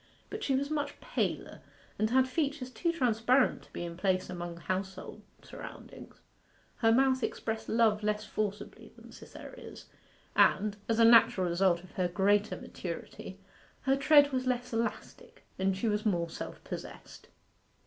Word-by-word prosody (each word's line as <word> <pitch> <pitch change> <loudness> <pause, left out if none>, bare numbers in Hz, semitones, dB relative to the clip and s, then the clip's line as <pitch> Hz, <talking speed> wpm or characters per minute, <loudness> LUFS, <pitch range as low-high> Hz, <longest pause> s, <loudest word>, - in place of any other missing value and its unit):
But 430 0 -5
she 270 - +1
was 280 +2 -1
much 290 -2 -2
paler, - - -3 0.4
and 215 - +2
had 260 +2 +3
features 275 -1 -2
too 340 +5 0
transparent 250 -3 +2
to - - -20
be - - -5
in 170 0 -6
place 185 0 0
among 175 -1 -6
household 185 +3 -5 0.2
surroundings. - - -11 0.6
Her 225 -1 +3
mouth 260 +2 +3
expressed 220 -1 -3
love 220 -2 +3
less 210 0 -1
forcibly 210 -1 -4
than - - -15
Cytherea's, - - -11 0.5
and, 205 +1 +4
as 225 - +2
a 230 - +6
natural 225 -5 +6
result 175 0 +2
of 185 - -15
her 180 -1 0
greater 205 +4 +2
maturity, - - -7 0.4
her 270 0 +2
tread 290 +1 +5
was 255 -1 -1
less 245 -1 -1
elastic, 230 +1 -4
and 190 0 +1
she 230 - -1
was 210 0 0
more 170 -6 0
self - - -7
possessed. - - -9
220 Hz, 150 wpm, -31 LUFS, 190-260 Hz, 0.6 s, a